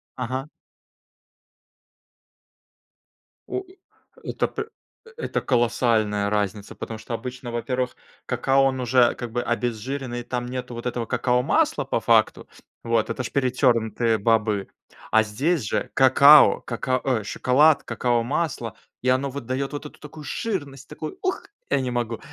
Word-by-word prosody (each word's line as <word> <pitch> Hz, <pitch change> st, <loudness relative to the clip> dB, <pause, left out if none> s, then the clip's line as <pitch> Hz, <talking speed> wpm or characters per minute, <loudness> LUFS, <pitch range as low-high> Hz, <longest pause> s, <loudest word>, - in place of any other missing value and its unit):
Ага. 130 Hz, +2 st, -3 dB, 3.0 s
О 380 Hz, -, -3 dB, 0.6 s
это -, -, -1 dB
п 440 Hz, 0 st, -5 dB, 0.5 s
это 475 Hz, -, -2 dB
колоссальная 115 Hz, -4 st, +1 dB
разница, 105 Hz, -1 st, -2 dB
потому 110 Hz, -, -6 dB
что 110 Hz, +2 st, -7 dB
обычно, 125 Hz, +1 st, -6 dB
во-первых, 125 Hz, +2 st, -2 dB, 0.3 s
какао 135 Hz, 0 st, +2 dB
он 130 Hz, -1 st, 0 dB
уже 125 Hz, 0 st, +3 dB
как 120 Hz, -2 st, -6 dB
бы 120 Hz, -, -1 dB
обезжиренный, 120 Hz, +1 st, -3 dB
там 120 Hz, 0 st, -3 dB
нету 125 Hz, -1 st, -5 dB
вот 120 Hz, -, -7 dB
этого 120 Hz, -1 st, -2 dB
какао-масла 125 Hz, +2 st, +1 dB
по -, -, -1 dB
факту. -, -, +2 dB, 0.3 s
Вот. 115 Hz, -1 st, +1 dB
Это 125 Hz, +2 st, -3 dB
же -, -, -6 dB
перетернутые 120 Hz, -4 st, +2 dB
бобы. 105 Hz, -2 st, +1 dB, 0.4 s
А 110 Hz, 0 st, +5 dB
здесь 140 Hz, +9 st, 0 dB
же 105 Hz, -, -2 dB
какао, 140 Hz, +3 st, +7 dB
кака 130 Hz, +2 st, -2 dB
ой, 125 Hz, -6 st, 0 dB
шоколад, 140 Hz, +8 st, +3 dB
какао-масло, 120 Hz, -, -1 dB, 0.3 s
и 130 Hz, -, -3 dB
оно, 130 Hz, +2 st, +2 dB
вот, 135 Hz, -2 st, -7 dB
дает 135 Hz, +3 st, -2 dB
вот 145 Hz, +1 st, -6 dB
эту 150 Hz, -, -10 dB
такую 150 Hz, 0 st, -11 dB
жирность, 145 Hz, -, -4 dB
такую, 155 Hz, 0 st, -7 dB
ух, 375 Hz, 0 st, -1 dB, 0.3 s
я -, -, +2 dB
не 130 Hz, -1 st, -2 dB
могу! 120 Hz, -2 st, -2 dB
125 Hz, 135 wpm, -24 LUFS, 115-135 Hz, 3.0 s, какао